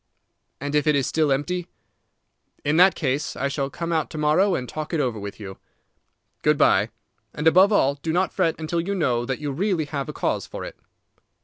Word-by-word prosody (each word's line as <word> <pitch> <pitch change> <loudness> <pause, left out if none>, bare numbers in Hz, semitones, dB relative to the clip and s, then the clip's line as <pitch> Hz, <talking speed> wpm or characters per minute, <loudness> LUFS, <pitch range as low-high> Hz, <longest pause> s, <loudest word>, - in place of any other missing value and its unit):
"And 145 +1 -4
if 150 0 +2
it 150 - +4
is 140 -2 +1
still 155 +1 +1
empty?" 170 +6 -1 1.0
"In 150 +2 +2
that 185 +2 +6
case 140 -1 -2
I 140 - -1
shall 140 -1 -2
come 170 +3 -5
out 160 -2 0
to 155 - -8
morrow 160 +6 +3
and 125 -4 -3
talk 155 +4 -4
it - - 0
over 125 -6 -1
with 100 +1 -7
you. 95 -2 -9 0.8
Good - - +3
by; - - +4 0.5
and, 150 - -4
above 185 +5 +6
all, 140 -9 +3
do 145 +3 -4
not 180 +1 0
fret 165 - +1
until 160 +2 -1
you 200 +4 -3
know 125 -9 0
that 130 +1 -2
you 145 -1 -4
really 175 +1 0
have 140 -2 -4
a - - -5
cause - - -2
for - - -7
it." - - -8
150 Hz, 210 wpm, -24 LUFS, 140-170 Hz, 1.0 s, that